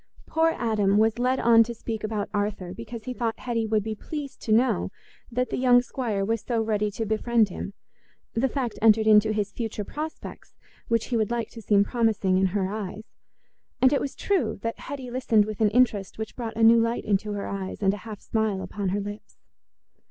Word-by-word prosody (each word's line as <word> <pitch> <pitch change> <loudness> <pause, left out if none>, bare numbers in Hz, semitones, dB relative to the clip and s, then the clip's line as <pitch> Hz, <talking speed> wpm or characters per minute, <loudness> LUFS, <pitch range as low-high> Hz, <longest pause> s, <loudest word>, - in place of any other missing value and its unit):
Poor 325 0 +2
Adam 210 -4 +2
was 220 +2 +3
led 255 +1 +1
on 230 -1 +6
to 235 +1 0
speak 220 -1 -5
about 215 -2 -2
Arthur 205 -3 -2
because 230 +1 -8
he 255 - -4
thought 230 -2 -2
Hetty 230 -3 -1
would 215 -1 +1
be 220 +1 -3
pleased 285 +5 -7
to 220 - -3
know 235 +4 +3 0.4
that 250 +2 -1
the - - -1
young 245 -1 +5
squire 225 -7 -2
was 225 +1 -1
so 235 -2 -1
ready 210 -1 0
to 220 +2 -4
befriend 220 0 +2
him; 195 +2 -6 0.6
the 255 +4 +1
fact 245 -6 -3
entered 220 0 +5
into 215 0 +5
his 210 -1 -1
future 220 -3 -4
prospects, 305 +9 -7 0.3
which 230 -1 +1
he 240 - +1
would 215 -2 +1
like 235 -2 -2
to 230 - -10
seem 200 -2 +4
promising 210 -5 +1
in 190 - +3
her 190 0 -1
eyes. 205 0 -5 0.8
And 260 +2 +5
it 280 - +2
was 275 - -4
true 325 - 0
that 230 0 -3
Hetty 265 -3 -7
listened 235 -4 +3
with 215 0 -6
an 215 - +5
interest 215 -4 +1
which 220 0 -6
brought 230 -3 -5
a 225 - +2
new 230 +1 +7
light 230 +1 0
into 205 +1 0
her 200 -1 -4
eyes 195 +1 -5
and 195 0 +4
a - - -4
half 210 0 -9
smile 220 -4 -1
upon 200 -2 -3
her 200 +2 0
lips. 205 +1 -8
220 Hz, 210 wpm, -26 LUFS, 205-235 Hz, 0.8 s, new